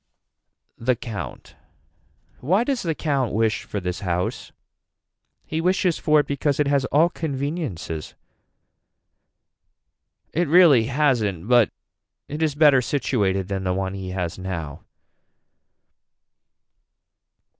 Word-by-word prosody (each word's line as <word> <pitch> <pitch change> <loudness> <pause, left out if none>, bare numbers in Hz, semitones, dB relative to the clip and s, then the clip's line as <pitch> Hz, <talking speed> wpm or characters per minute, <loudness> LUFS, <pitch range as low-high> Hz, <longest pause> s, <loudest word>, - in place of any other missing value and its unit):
The 125 +2 +1
count. 110 -3 -7 0.8
Why 185 - +2
does 265 -1 -1
the 165 -3 -2
count 140 -7 -1
wish 110 0 +1
for 105 - -4
this 90 -1 -4
house. 90 -1 -3 0.9
He 160 +1 -3
wishes 180 0 +1
for 150 -1 +4
it - - -9
because 140 0 -1
it 150 - +3
has 140 -1 +2
all 155 +5 +4
conveniences. 140 - -4 2.2
It 170 +1 +1
really 155 -8 +6
hasn't 120 - 0
but 120 -3 +5 0.6
it 150 +2 -5
is 155 -3 +1
better 145 -4 +5
situated 100 -8 0
than 95 -1 -3
the 90 -1 0
one 95 0 -2
he 95 -1 -6
has 90 -2 -4
now. 85 -6 -5
130 Hz, 115 wpm, -23 LUFS, 95-150 Hz, 2.2 s, really